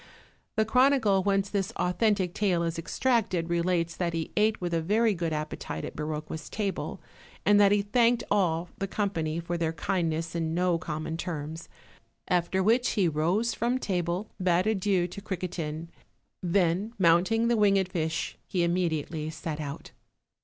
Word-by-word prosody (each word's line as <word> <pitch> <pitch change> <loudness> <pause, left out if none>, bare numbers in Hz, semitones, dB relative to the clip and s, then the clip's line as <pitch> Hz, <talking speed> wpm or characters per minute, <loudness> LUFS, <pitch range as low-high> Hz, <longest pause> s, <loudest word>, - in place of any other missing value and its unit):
The 220 -1 +2
chronicle 250 -4 +4
whence 195 0 +1
this 195 -2 -1
authentic 185 0 +1
tale 185 -5 +1
is 165 0 -2
extracted 190 -4 0
relates 170 -1 +1
that 170 -2 -1
he 165 -1 -3
ate 215 +1 +2
with 175 -1 -3
a 165 - +1
very 215 +6 +2
good 170 -3 -2
appetite 150 - -4
at - - -7
Biroqua's 155 0 -5
table, 205 -3 -3 0.5
and 205 0 +6
that 200 -1 +6
he 205 0 +3
thanked 235 +3 +3
all 175 -4 +1
the 195 - -1
company 170 -6 -1
for 170 0 -3
their 165 -1 0
kindness 165 -1 -1
in 165 -1 -1
no 175 -1 +2
common 155 +1 -4
terms; 160 -2 -5 0.6
after 180 +1 +1
which 235 +5 +3
he 195 -5 +2
rose 175 +9 +1
from 240 +2 0
table, 180 -2 -2
bade 180 0 +3
adieu 195 -4 +1
to 185 +3 -9
Criquetin, 170 -5 -4 0.5
then, 185 +3 +1
mounting 190 +6 +3
the 235 - +3
winged 200 -3 +3
fish, 160 -2 -2
he 180 -2 0
immediately 165 -3 -1
set 155 -1 -5
out. 140 -1 -7
180 Hz, 155 wpm, -28 LUFS, 165-205 Hz, 0.6 s, and